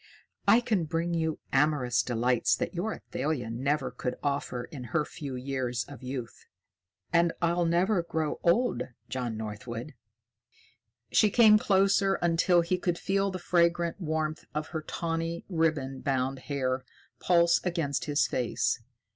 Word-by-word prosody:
"I 235 - +7
can 210 -8 0
bring 165 +2 -1
you 160 -2 0 0.2
amorous 135 -4 +3
delight 120 0 0
that - - -3
your 185 +5 -2
Athalia 130 - -3
never 135 +2 -1
could 125 +1 -3
offer 140 -3 -1
in 125 0 -8
her 150 +6 0
few 140 -5 -7
years 125 -2 -2
of 135 -3 -12
youth. 125 -2 -6 0.7
And 170 0 +4
I'll 170 0 +1
never 175 +3 +2
grow 160 -2 -2
old, 240 +9 +2 0.3
John 125 -4 -3
Northwood." 115 +5 -6 1.2
She 215 - +5
came 215 -1 +6
closer 195 -1 +3
until 175 +1 +3
he 180 +2 -1
could 175 -1 0
feel 195 +2 0
the 185 - -4
fragrant 170 0 +1
warmth 155 -1 -2
of 155 0 -2
her 160 - -3
tawny, 165 +1 -3
ribbon 155 -6 0
bound 135 -1 -1
hair 130 -2 -1 0.4
pulse 170 -1 +4
against 165 -6 -1
his 145 -1 +2
face. 120 -1 0
155 Hz, 140 wpm, -29 LUFS, 130-175 Hz, 1.2 s, I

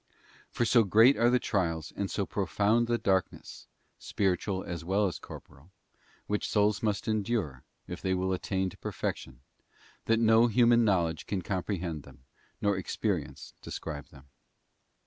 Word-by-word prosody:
For 120 - -1
so 115 0 +5
great 110 +7 +6
are 120 +1 +3
the 125 - +4
trials, 80 -9 -2
and 100 -1 -2
so 100 - -2
profound 105 +4 +1
the 120 0 +1
dark 95 -4 +1
ness, - - -13 0.3
spiritual 95 0 -1
as 85 -1 -6
well 95 +4 +1
as 95 - -3
corporal, 70 +6 -13 0.6
which 105 0 -2
souls 105 0 +2
must 105 -1 -1
endure, 105 - -1 0.3
if - - -7
they 95 -1 0
will 95 +1 -1
attain 95 0 -2
to - - -15
perfection, 65 -1 -5 0.6
that 115 - +3
no 115 +1 +5
human 120 +1 +4
knowledge 85 -7 0
can 95 -3 -2
comprehend 90 -4 -3
them, 65 - -17 0.4
nor 100 -2 +1
experience 95 - -3
describe 75 -3 -6
them. 70 0 -17
100 Hz, 150 wpm, -29 LUFS, 90-110 Hz, 0.6 s, great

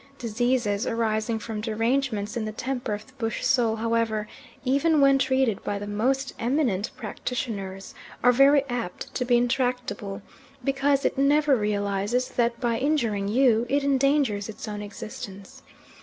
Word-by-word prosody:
Diseases 235 -2 0
arising 225 0 0
from 220 -1 -5
derangements 225 -1 -1
in 235 - -1
the 215 - -3
temper 245 -1 -3
of 210 - -10
the 260 - -21
bush 225 -2 -2
soul 240 -5 +3
however, 225 -1 0 0.4
even 285 +4 +3
when 275 -1 +5
treated 260 -5 +1
by 205 - -2
the 205 - -5
most 255 +6 0
eminent 235 -5 0
practitioners, 210 -4 -5 0.3
are 245 - +7
very 275 +2 +5
apt 240 -8 -5
to 250 - -1
be 245 -1 +3
intractable, 240 -5 -1 0.4
because 275 +1 +1
it - - 0
never 290 +1 +4
realises 205 +2 0
that 235 -1 0
by 235 -2 0
injuring 235 -9 0
you 235 +1 +3
it 280 +1 +2
endangers 275 -6 +2
its 220 - -7
own 210 -1 -5
existence. 200 -1 -9
235 Hz, 145 wpm, -26 LUFS, 210-265 Hz, 0.4 s, are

